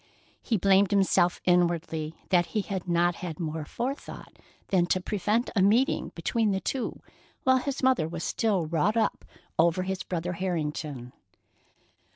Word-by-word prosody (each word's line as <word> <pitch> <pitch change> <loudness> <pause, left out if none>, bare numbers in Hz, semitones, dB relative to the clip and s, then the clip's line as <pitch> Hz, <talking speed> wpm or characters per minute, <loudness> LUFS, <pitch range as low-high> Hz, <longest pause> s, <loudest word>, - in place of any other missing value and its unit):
He 225 - 0
blamed 195 +1 +4
himself 190 -3 +3
inwardly 170 -3 +1
that 175 -2 +3
he - - +3
had 190 -3 -5
not 175 0 +2
had 170 -4 -6
more 160 -2 -3
forethought 260 - -6 0.3
than 180 -3 +3
to 185 - +1
prevent 210 +5 -1
a 200 - +3
meeting 225 +8 +2
between 225 -3 0
the 190 -1 0
two 260 +5 -3 0.4
while 260 0 +5
his 275 +1 -4
mother 255 -12 +3
was 165 0 -5
still 205 -7 0
wrought 170 +8 +1
up 225 - 0 0.4
over 170 +2 +3
his 190 0 -3
brother 175 0 -3
Harrington. 150 -8 -3
185 Hz, 150 wpm, -27 LUFS, 170-210 Hz, 0.4 s, while